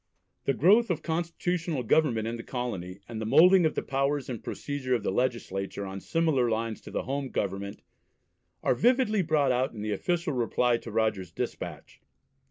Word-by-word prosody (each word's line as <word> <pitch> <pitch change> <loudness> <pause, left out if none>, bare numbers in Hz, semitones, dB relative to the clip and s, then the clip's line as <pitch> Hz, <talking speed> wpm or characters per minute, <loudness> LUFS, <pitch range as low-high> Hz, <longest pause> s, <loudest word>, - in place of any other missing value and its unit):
The 135 - +1
growth 205 - +5
of 175 - -1
constitutional 170 -2 -2
government 115 -4 +2
in 115 - -2
the 115 - -6
colony, 100 -8 -5
and 115 -2 -6
the - - -2
moulding 180 +6 +6
of 155 - -4
the - - -1
powers 140 0 -1
and 115 - -6
procedure 135 -3 -2
of 115 - -2
the - - 0
legislature 100 -4 -2
on 95 0 -6
similar 155 -7 +1
lines 115 0 -2
to - - -11
the - - -3
home 135 0 -3
Government, 100 -1 -3 0.8
are - - +3
vividly 235 - +3
brought 155 -5 +2
out 125 +1 0
in 105 -2 -6
the 105 -1 -1
official 170 - -1
reply 120 0 +2
to 115 - -9
Rogers's 110 -5 0
despatch. - - -6
125 Hz, 175 wpm, -28 LUFS, 110-160 Hz, 0.8 s, moulding